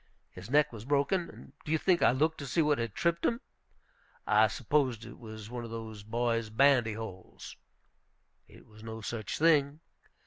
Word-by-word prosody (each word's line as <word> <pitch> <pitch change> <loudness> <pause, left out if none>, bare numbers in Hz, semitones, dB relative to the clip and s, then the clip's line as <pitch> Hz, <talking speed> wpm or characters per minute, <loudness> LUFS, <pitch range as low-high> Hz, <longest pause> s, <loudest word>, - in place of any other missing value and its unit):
His 90 +4 -11
neck 145 -1 +3
was 110 -2 -8
broken. 145 +7 +1
And - - -14
do 150 - -5
you 160 - +3
think 175 +2 +2
I - - +6
looked 155 +6 +1
to 140 - -6
see 165 +5 +2
what 150 -2 +2
had 115 -4 -3
tripped 170 0 0
him? 235 - +1 0.9
I - - +5
supposed 130 -7 0
it 120 - -11
was 110 -1 -9
one 120 -1 -5
of 115 - -7
the 110 -2 -7
boys' 115 -1 0
bandy 120 -1 +4
holes. 105 -4 -9 0.9
It - - -17
was 110 0 -17
no 110 0 -7
such 110 -1 -4
thing. 150 -2 +3
120 Hz, 180 wpm, -30 LUFS, 110-150 Hz, 0.9 s, I